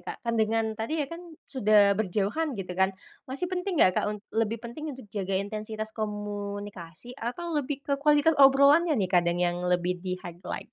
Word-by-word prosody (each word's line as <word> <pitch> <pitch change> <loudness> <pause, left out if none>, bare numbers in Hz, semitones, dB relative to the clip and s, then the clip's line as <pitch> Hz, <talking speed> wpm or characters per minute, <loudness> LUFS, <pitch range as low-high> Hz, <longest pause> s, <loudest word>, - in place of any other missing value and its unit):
Kak, - - -7
kan 235 - 0
dengan 225 +1 +1
tadi 225 +8 -3
ya 300 - 0
kan 335 - -7 0.2
sudah 210 -6 +4
berjauhan 215 - -1
gitu 185 -2 -5
kan 190 +1 +2 0.4
masih 270 +6 -3
penting 365 0 -2
nggak, 185 -10 +4
Kak, - - -2
un 210 - -3 0.2
lebih 225 0 0
penting 275 +7 -6
untuk 260 - -11
jaga 195 -2 -1
intensitas 215 +2 -4
komunikasi 205 -2 -6
atau 335 +9 -4
lebih 285 -2 -2
ke 280 - -2
kualitas 295 +2 +4
obrolannya 280 +4 +6
nih 190 -5 0
kadang 175 -1 +3
yang 175 0 0
lebih 180 0 0
di 185 0 -3
highlight? 175 +1 -7
215 Hz, 180 wpm, -27 LUFS, 190-275 Hz, 0.4 s, obrolannya